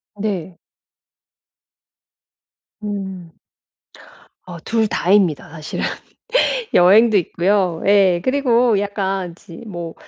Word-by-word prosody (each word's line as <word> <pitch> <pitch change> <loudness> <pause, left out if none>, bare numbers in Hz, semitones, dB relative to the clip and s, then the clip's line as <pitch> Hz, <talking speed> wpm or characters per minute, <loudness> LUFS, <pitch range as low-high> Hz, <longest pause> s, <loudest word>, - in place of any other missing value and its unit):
네. 190 -4 -4 2.3
음. 190 -5 -6 1.1
어 175 -2 -8
2 225 +4 0
다입니다 185 -7 +1
사실은. 155 -1 -5 0.9
여행도 210 +5 +5
있고요. 180 -1 0
예. 195 -4 +4
그리고 245 -4 +2
약간 195 -3 -3
지 175 -2 -14
뭐 175 -5 -7
195 Hz, 145 characters per minute, -19 LUFS, 175-210 Hz, 2.3 s, 여행도